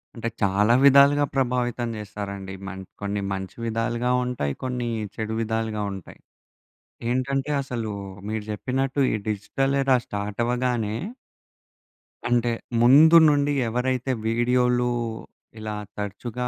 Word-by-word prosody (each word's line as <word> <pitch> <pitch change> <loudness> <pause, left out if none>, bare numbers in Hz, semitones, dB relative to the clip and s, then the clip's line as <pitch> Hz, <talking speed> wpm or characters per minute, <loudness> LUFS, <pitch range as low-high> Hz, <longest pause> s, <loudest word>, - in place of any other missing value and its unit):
అంటే, 115 0 -3
చాలా 100 +3 +3
విధాలుగా 140 +1 +6
ప్రభావితం 120 -2 0
చేస్తారండి. 100 -2 -6
మం 95 0 -6 0.2
కొన్ని 100 0 -2
మంచి 95 -1 -6
విధాలుగా 115 +2 -1
ఉంటాయి. 110 - -2
కొన్ని 125 -2 -2 0.3
చెడు 110 0 -3
విధాలుగా 110 -1 -2
ఉంటాయి. 95 -3 -10 0.9
ఏంటంటే, 135 +3 0
అసలు 120 -5 -4 0.4
మీరు 110 -1 -3
చెప్పినట్టు 135 +5 -2
ఈ - - +1
డిజిటల్ 135 +7 -1
ఎరా 135 -1 +4
స్టార్ట్ 100 +2 -4
అవ్వగానే. 120 -3 0 1.3
అంటే, 120 -1 +2 0.3
ముందు 150 +7 +7
నుండి 145 0 +2
ఎవరైతే 125 +2 -1 0.2
వీడియోలు 125 +1 +2 0.7
ఇలా 110 0 -4 0.2
తరచుగా 110 +4 -4
120 Hz, 110 wpm, -24 LUFS, 105-130 Hz, 1.3 s, ముందు